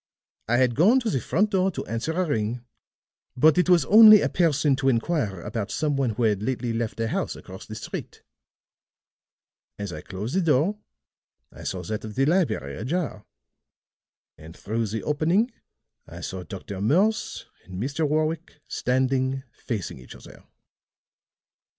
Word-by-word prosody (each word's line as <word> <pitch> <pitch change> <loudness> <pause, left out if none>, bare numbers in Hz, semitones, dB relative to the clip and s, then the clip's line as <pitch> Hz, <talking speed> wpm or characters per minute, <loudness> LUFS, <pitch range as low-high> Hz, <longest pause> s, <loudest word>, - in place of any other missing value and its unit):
I 120 +2 +2
had 125 -1 +3
gone 200 - +5
to 230 -3 -1
the 135 - 0
front 205 - +1
door 190 0 +2
to 185 - -5
answer 115 +9 -3
a 185 +2 0
ring, 120 -4 -2 0.7
but 155 +6 +5
it 180 - +2
was 175 -6 +5
only 215 -1 +9
a - - +1
person 150 -5 +2
to 135 -1 +2
inquire 115 - 0
about 105 +1 -4
some 150 -2 -1
one 135 -3 +1
who 120 - -1
had 105 -3 +2
lately 120 0 -2
left 115 -1 -3
a 115 - 0
house - - -2
across - - -11
the - - -7
street. - - -7 1.5
As 100 -3 -5
I 75 - -7
closed 100 - -6
the 190 - +3
door, 165 +6 +2 0.7
I - - -13
saw 90 -1 -3
that 105 +5 -4
of 110 -1 -7
the 135 - +2
library 150 - 0
ajar; 145 -2 -3 1.1
and 80 +2 -12
through 110 +2 -2
the 110 +2 -4
opening 170 - +1 0.6
I - - -10
saw 95 - -5
Dr. 95 0 -7
Morse 190 - +1 0.2
and 95 - -10
Mr. 145 +6 -1
Warwick 155 +1 -1
standing 130 +1 0
facing 110 - -5
each 65 - -12
other. - - -14
130 Hz, 160 wpm, -25 LUFS, 110-165 Hz, 1.5 s, only